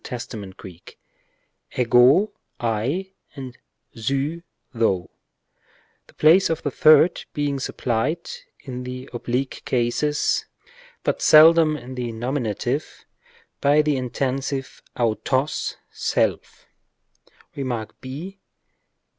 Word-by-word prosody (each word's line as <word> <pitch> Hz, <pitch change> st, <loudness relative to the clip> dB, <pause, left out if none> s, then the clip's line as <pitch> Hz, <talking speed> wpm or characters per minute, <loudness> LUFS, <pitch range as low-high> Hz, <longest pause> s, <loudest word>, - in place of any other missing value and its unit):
Τὶ, 105 Hz, -6 st, -7 dB
Greek, 90 Hz, -3 st, -13 dB, 0.8 s
ἐγώ, 125 Hz, -, +5 dB, 0.3 s
1, 120 Hz, -, -1 dB, 0.3 s
and 130 Hz, -3 st, -8 dB, 0.4 s
σύ, 140 Hz, +8 st, -2 dB, 0.3 s
thou, 100 Hz, -7 st, 0 dB, 1.0 s
the -, -, -21 dB
place 165 Hz, +5 st, +5 dB
of 165 Hz, -1 st, -2 dB
the 145 Hz, -, -1 dB
third 155 Hz, +5 st, +5 dB
being 145 Hz, -2 st, -1 dB
supplied 130 Hz, +6 st, -2 dB, 0.3 s
(in 125 Hz, -2 st, -6 dB
the 125 Hz, +1 st, -7 dB
oblique 125 Hz, +2 st, -3 dB
cases, 130 Hz, +5 st, 0 dB, 0.6 s
but -, -, -1 dB
seldom 155 Hz, 0 st, +7 dB
in 130 Hz, -1 st, -9 dB
the 125 Hz, -2 st, -4 dB
nominative) 120 Hz, -2 st, -3 dB, 0.5 s
by 145 Hz, +2 st, +4 dB
the 150 Hz, -1 st, +1 dB
intensive 135 Hz, +1 st, -3 dB, 0.2 s
αὐτός, 120 Hz, +5 st, 0 dB, 0.2 s
self, -, -, -1 dB, 0.9 s
Rem, 140 Hz, -2 st, -3 dB
ὃ. 130 Hz, -, -6 dB
130 Hz, 95 wpm, -23 LUFS, 120-150 Hz, 1.0 s, seldom